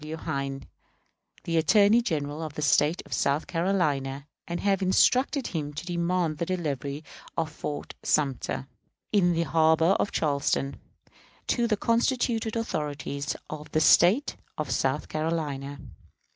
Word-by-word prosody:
W. 155 +1 -6
Hayne, 140 -4 -3 0.8
the 165 -1 -1
Attorney 205 +7 +5
General 150 -7 -2
of 155 -3 -6
the 150 - -3
State 155 +5 +3
of - - -7
South 140 +3 +1
Carolina, 150 -7 0 0.2
and 170 0 -3
have 200 -1 +1
instructed 255 +8 +3
him 150 -3 -3
to 160 +3 -5
demand 170 -2 -1
the 170 - 0
delivery 145 -5 -3 0.3
of 160 -2 -1
Fort 150 -1 -5
Sumter, 130 - 0 0.5
in 175 -4 +3
the 165 0 +1
harbor 160 +1 +3
of - - 0
Charleston, 140 -2 0 0.7
to 240 -1 +1
the 215 -2 +1
constituted 230 0 +1
authorities 145 -8 -3
of 155 0 -8
the 155 - +3
State 185 - +5 0.2
of - - -3
South - - 0
Carolina. 150 -3 -3
160 Hz, 135 wpm, -27 LUFS, 145-185 Hz, 0.8 s, Attorney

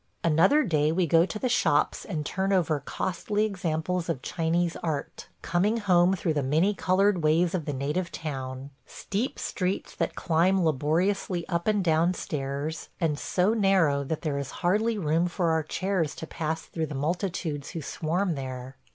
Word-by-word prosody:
Another 170 - +4
day 155 - +2
we 175 +2 +2
go 165 +2 +4
to 215 - -5
the 255 - -1
shops 245 - +2
and 155 -7 -3
turn 190 +5 -1
over 165 -6 +2
costly 190 +8 -1
examples 180 -3 -2
of 135 -6 -2
Chinese 165 +1 0
art 155 -4 -4
– - - -42
coming 195 +6 +1
home 185 -3 +4
through 170 -3 -1
the 145 - 0
many 160 +10 +2
colored 190 -1 +2
ways 160 +3 +3
of 175 -5 -2
the - - -2
native 150 +7 -2
town; 135 -3 -5
– - - -41
steep 220 +5 -3
streets 185 +1 -2
that - - -2
climb 175 +2 +2
laboriously 170 +5 0
up 170 0 -2
and 210 -2 +2
down 170 +2 +2
stairs, 145 +1 -4
and 155 -4 0
so 185 +4 +1
narrow 190 -10 +3
that 155 +3 -4
there 145 -3 -1
is 140 - -4 0.2
hardly 215 +5 +2
room 165 -1 +1
for 175 -1 0
our 160 0 +2
chairs 170 0 -1
to - - -6
pass 160 0 -3
through 160 -2 -4
the 150 - -6
multitudes 160 -1 -2
who 165 - -5
swarm 170 +6 -1
there. 130 -2 -6
170 Hz, 175 wpm, -27 LUFS, 155-185 Hz, 0.2 s, Another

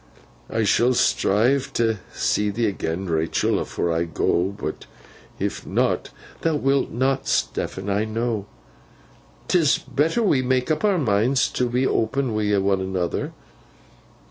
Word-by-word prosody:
'I 115 - 0
shall 120 +5 +3
strive 130 +7 +2
t' 115 -2 +1
see 105 0 0
thee 110 +3 0
agen, 95 -1 -3
Rachael, 80 -1 0
afore 85 - -2
I 85 +1 0
go, 85 +1 +1
but 100 +1 -5 0.5
if - - -3
not—' - - 0 0.3
'Thou 165 -2 +1
wilt 135 -1 +1
not, 135 +2 0
Stephen, 95 +1 -1
I 100 +2 +1
know. 110 -2 -2 1.0
'Tis 165 -5 +3
better 150 - 0
that 220 - +2
we 135 -8 +3
make 130 +2 0
up 155 - -1
our 205 -3 +3
minds 125 -1 +2
to 125 -1 -1
be 125 +2 +1
open 125 +1 0
wi' 105 -1 +1
one 95 0 +1
another. 95 -2 -2
115 Hz, 145 wpm, -23 LUFS, 100-135 Hz, 1.0 s, shall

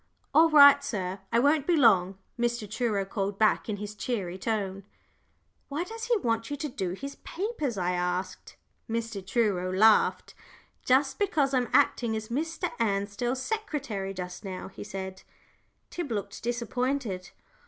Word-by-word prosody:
"All 320 +3 +6
right, 285 -2 +8
sir, 195 -8 -3
I 230 - +3
won't 285 +3 +3
be 350 - +4
long," 195 -8 +4 0.2
Mr. 240 -2 -1
Truro 215 -2 -1
called 195 0 -3
back 215 +1 +2
in 205 - -2
his 210 +1 -6
cheery 200 -5 -3
tone. 195 -3 -2 0.9
"Why 295 +4 -2
does 450 +4 -6
he 475 -1 +2
want 230 - -1
you 290 - -3
to 300 - -3
do 190 -10 -3
his 275 +8 -7
papers?" 330 - -3
I 180 -1 0
asked. 180 +1 -3 0.3
Mr. 225 -3 -3
Truro 190 -4 0
laughed. 215 +3 +4 0.9
"Because 300 -9 +1
I'm 250 -2 +1
acting 230 -2 +3
as 220 0 -5
Mr. 325 +7 -2
Ansdell's 225 +4 -1
secretary 280 - -3
just 180 +2 -6
now," 190 -1 -6
he - - -9
said. 190 -2 -6 0.7
Tib 345 -7 -4
looked 205 -2 -4
disappointed. 240 -4 -2
225 Hz, 145 wpm, -28 LUFS, 195-280 Hz, 0.9 s, right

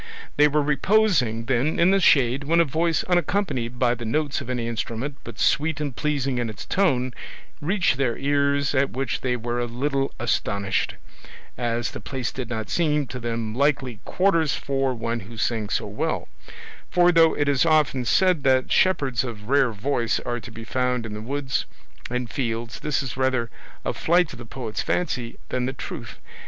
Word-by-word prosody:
They 150 +1 +6
were 150 0 +1
reposing, 145 - +2
then, 130 +5 +1
in 175 +2 +5
the 195 - +4
shade, 135 -5 +4
when 165 +3 +3
a 170 - +5
voice 160 +3 +1
unaccompanied 170 - 0
by 120 -1 +3
the 120 -1 -6
notes 145 +6 -1
of 130 - -8
any 120 -2 -2
instrument, 115 +4 -3
but 120 -2 -9
sweet 155 0 +2
and 145 -5 -3
pleasing 140 -3 -1
in 120 -2 -1
its 110 - -8
tone, 130 -10 +1 0.5
reached 175 -3 +1
their 130 -4 0
ears, 140 0 +1
at 135 0 +2
which 135 0 -2
they 125 -1 0
were 120 0 -2
not 120 0 -2
a 120 - -10
little 135 0 0
astonished, 100 -3 0 0.6
as 120 -1 -1
the - - -7
place 130 -3 -4
did 130 -3 -5
not 110 -3 -3
seem 150 -4 +2
to 125 - -5
them 115 -2 -3
likely 130 -3 +1
quarters 170 -6 +2
for 135 -2 -1
one 115 0 -2
who 115 +4 -11
sang 110 -2 -1
so - - 0
well; - - -2 0.6
for 175 0 +5
though 165 -1 +5
it 145 - 0
is 140 -2 +3
often 155 -5 +3
said 180 +6 +3
that 130 -1 +3
shepherds 140 -10 +2
of 110 -3 -7
rare 135 -3 +4
voice 115 +2 0
are 120 0 -3
to 120 - -10
be 115 0 -9
found 125 0 -1
in 110 - -6
the 105 - -5
woods 135 +3 -2 0.4
and 125 -1 -3
fields, 115 -3 -3
this 145 -2 -1
is 130 - -5
rather 130 -3 0 0.3
a - - 0
flight 170 -2 +2
of 120 - -11
the 120 - -9
poet's 115 -3 -4
fancy 125 -9 -2
than 125 0 -1
the 130 - -2
truth. - - -7
130 Hz, 190 wpm, -24 LUFS, 120-150 Hz, 0.6 s, They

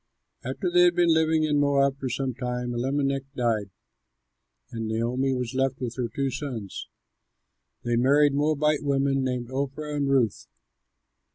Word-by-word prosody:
After 135 +8 -3
they 175 0 +5
had 175 -1 +5
been 175 -2 +4
living 160 0 +2
in 150 -1 +2
Moab 140 -1 +2
for 130 - -3
some 130 +1 -2
time, 125 -1 -3
Elimelech 135 +3 0
died, 115 -5 0 1.0
and 115 -1 -4
Naomi 120 +4 0
was 125 -1 -2
left 135 0 0
with 120 -2 -4
her 125 -2 -2
two 135 +2 -2
sons. 120 -9 -6 1.0
They 120 -1 0
married 140 +4 +4
Moabite 150 +1 +1
women, 135 -1 +1
named 125 -1 -3
Orpah 140 +3 -3
and 140 -1 0
Ruth. 130 -6 +1
135 Hz, 150 wpm, -26 LUFS, 125-145 Hz, 1.0 s, they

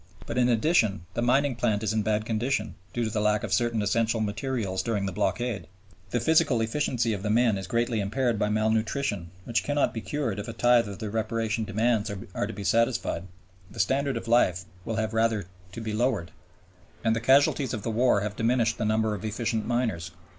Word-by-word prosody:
But - - -2
in 125 0 +4
addition, 110 - +2
the - - -1
mining 130 +2 +2
plant 110 -3 0
is 110 0 0
in 110 - +1
bad 110 +1 0
condition 110 0 -1 0.2
(due 120 - -1
to 110 - -1
the 105 - -1
lack 105 0 +2
of - - -2
certain 120 -3 +1
essential 115 +3 +1
materials 110 -2 -2
during 110 -4 -1
the 95 - -2
blockade), 105 -3 -1 0.4
the 120 - 0
physical 150 -1 +3
efficiency 120 -1 0
of 100 - -4
the 105 - -2
men 115 0 +3
is 95 -2 -5
greatly 115 +2 0
impaired 115 +3 0
by 105 - +1
malnutrition 110 -2 0 0.2
(which 115 - 0
cannot 145 -2 +1
be 115 - -4
cured 125 -8 -2
if 105 - -5
a 115 - -5
tithe 120 0 +4
of 100 - -7
the 110 -2 -5
reparation 110 0 -1
demands 110 +1 +1 0.2
are - - -1
to - - -5
be 100 - -6
satisfied, 115 -2 +1 0.4
the - - -11
standard 135 -1 +1
of 115 - -6
life 90 -6 +3 0.2
will 115 - -2
have 110 0 -1
rather 110 -3 +1 0.3
to 115 - -7
be 110 -1 -4
lowered), 110 -6 0 0.7
and 110 -1 +2
the 115 - -2
casualties 135 +1 +4
of 110 -4 -4
the 115 - -2
war 115 -2 +3
have 105 0 -3
diminished 115 0 +1
the 110 - 0
numbers 110 0 +1
of 105 - -6
efficient 110 0 -2
miners. 115 -8 -1
115 Hz, 205 wpm, -27 LUFS, 105-120 Hz, 0.7 s, in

